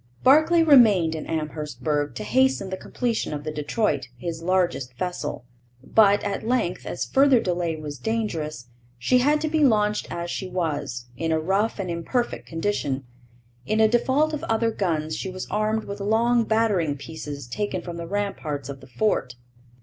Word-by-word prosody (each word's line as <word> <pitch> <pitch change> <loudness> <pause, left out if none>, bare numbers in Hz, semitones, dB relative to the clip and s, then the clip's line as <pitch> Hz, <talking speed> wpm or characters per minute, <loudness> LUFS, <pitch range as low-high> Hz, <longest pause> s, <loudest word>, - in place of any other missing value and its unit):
Barclay 315 +5 +6
remained 215 - +6
in 155 - -5
Amherstburg 150 -3 -2
to - - -4
hasten 260 -7 +2
the - - -1
completion 230 -4 -2
of 145 - -6
the 155 - -3
Detroit, 150 - -1
his 165 +5 -5
largest 170 -8 0
vessel. 155 -7 -4 0.4
But, 205 +5 +4
at 200 -1 -2
length, 225 -6 -1
as - - -3
further 270 -2 +4
delay 175 -4 -1
was 150 -3 -7
dangerous, 160 - -3 0.3
she 250 - +3
had 295 +4 +3
to 315 - 0
be 310 0 +1
launched 210 -5 +2
as 170 0 -4
she 190 - -3
was, 145 -9 -3
in 165 0 -1
a 160 - +2
rough 195 +7 0
and 190 -3 -3
imperfect 235 +9 -2
condition. 165 -6 -2 0.6
In 215 - +1
default 270 +6 +2
of 300 - -4
other 225 0 +1
guns, 160 -7 -1
she 190 - -4
was 185 0 -6
armed 215 +1 0
with 200 +1 -7
long 230 +3 +2
battering 205 -10 +1
pieces 145 -2 -7
taken 185 +7 -3
from 170 -1 -6
the 170 0 -6
ramparts 160 -9 -3
of 135 -1 -7
the 130 - -13
fort. 125 - 0
185 Hz, 165 wpm, -24 LUFS, 155-225 Hz, 0.6 s, Barclay